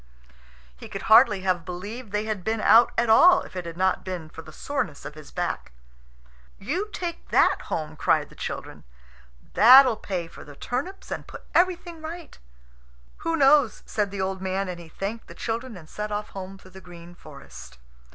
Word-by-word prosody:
He - - -12
could - - -6
hardly 220 -3 +6
have 185 -2 0
believed 205 +6 -7
they 210 +1 -1
had 215 -4 -3
been 220 +2 -1
out 230 +2 +6
at 235 - +2
all 355 +11 +7
if - - -13
it 180 -2 -5
had 170 0 -8
not 190 0 +1
been 180 -4 -6
for 165 - -10
the 160 - -13
soreness 175 - -4
of 150 - -7
his 155 -1 -13
back. - - -4 0.8
"You 345 - -3
take 345 -4 -6
that - - +3
home," 155 -1 -4
cried - - +1
the - - -17
children. - - -7 0.7
"That'll 255 0 +8
pay 180 -5 -4
for - - -13
the 145 - -13
turnips, 285 - -5
and - - -5
put - - -11
everything 350 -2 +1
right." 330 +2 -8 0.8
"Who 330 0 -2
knows?" 275 -5 +4
said 210 -2 -1
the 195 -1 -5
old 190 0 -3
man; 190 +1 -2
and 175 -1 -6
he 170 -1 -12
thanked 205 +7 -6
the - - -12
children, 230 -1 -4
and 160 -3 -13
set 210 +5 -6
off 210 0 -3
home 195 0 -8
through 185 -1 -17
the 190 +1 -12
green 175 -1 -13
forest. 70 - -13
200 Hz, 190 wpm, -25 LUFS, 175-250 Hz, 0.8 s, That'll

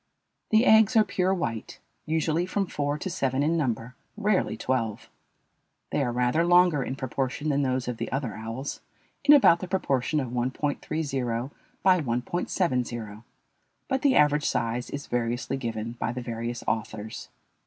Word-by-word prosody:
The 220 +2 +4
eggs 220 +1 +6
are 220 - +7
pure 185 -1 0
white, 115 - -3 0.3
usually 160 +2 0
from 195 +1 0
four 145 -4 -2
to 150 - -5
seven 135 -7 0
in 160 +3 +2
number, 125 -5 -1 0.2
rarely 210 -2 +1
twelve. 115 -5 -2 0.8
They - - +1
are 125 -3 0
rather 125 +6 +2
longer 175 -4 +5
in 130 - -3
proportion 135 +3 -2
than 140 -1 +2
those 130 -2 0
of 125 -2 -3
the - - -4
other 130 -4 -2
owls 115 +6 -5 0.4
in 295 - +8
about 170 -11 +6
the 185 - -5
proportion 155 -5 0
of 130 -4 -3
1.30 130 +4 -1 0.3
× 125 -2 -2 0.3
1.70. 125 - 0 0.6
But 265 -1 0
the 275 -3 +4
average 150 0 +4
size 115 +2 -1
is 140 0 -5
variously 120 +2 -1
given 115 -3 -4
by 120 - -3
the 125 - -4
various 115 0 -4
authors. 110 -1 -3
135 Hz, 155 wpm, -27 LUFS, 120-170 Hz, 0.8 s, in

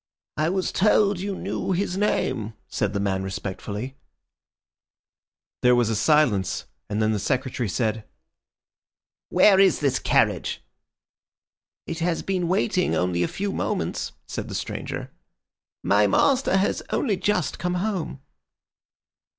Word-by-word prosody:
"I 155 +2 +1
was 190 0 -1
told 205 -1 +3
you 195 +1 -3
knew 190 - -2
his 180 0 -1
name," 130 - 0
said 105 -1 -1
the 100 - -1
man 95 -1 0
respectfully. 100 +6 -5 1.6
There 125 0 +5
was 120 -2 +2
a - - 0
silence, 120 - +2 0.2
and 105 - -1
then 110 0 +2
the 105 - 0
Secretary 125 0 -1
said— 110 +2 -1 1.3
"Where 195 -2 +6
is 195 -3 +5
this 140 -3 +1
carriage?" - - +1 1.2
"It 165 - -5
has 165 0 0
been 185 -3 -1
waiting 185 0 +1
only 90 -1 0
a 85 - +2
few 200 0 -3
moments," - - -2
said - - -5
the - - -6
stranger. - - -5 0.7
"My - - +4
master 265 -8 +3
has 195 - +1
only 220 -7 +1
just 180 -5 -1
come 180 +1 -1
home." 180 -7 -2
155 Hz, 130 wpm, -24 LUFS, -, 1.6 s, Where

